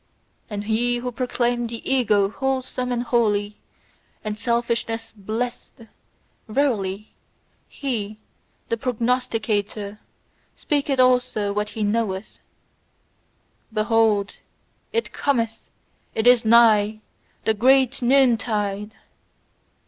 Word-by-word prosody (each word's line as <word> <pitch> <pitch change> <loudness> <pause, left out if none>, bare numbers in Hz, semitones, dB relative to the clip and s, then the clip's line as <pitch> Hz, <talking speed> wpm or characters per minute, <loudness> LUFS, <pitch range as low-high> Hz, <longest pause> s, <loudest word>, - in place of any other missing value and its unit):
And 205 -1 -4
he 235 +3 +1
who 250 +1 -4
proclaimeth 240 -1 -1
the 230 0 -7
EGO 210 -7 +2
wholesome 260 -1 -2
and 240 0 -1
holy, 210 -4 +1 0.7
and 215 -1 -3
selfishness 235 0 -1
blessed, 225 +4 -5 0.7
verily, 215 -5 -1 0.6
he, 215 -6 -4 0.5
the 230 - 0
prognosticator, 225 -4 -1 0.6
speaketh 285 -2 -1
also 250 -5 +2
what 210 +1 -1
he 215 - 0
knoweth: 205 -2 -2 1.3
"BEHOLD, 215 -2 +1 0.5
IT 460 +1 -2
COMETH, 230 -6 -1 0.5
IT 220 - 0
IS 245 -2 +6
NIGH, 220 -2 +5 0.5
THE 220 - +3
GREAT 260 +4 +3
NOONTIDE!" 220 -5 +2
230 Hz, 90 wpm, -23 LUFS, 210-250 Hz, 1.3 s, IS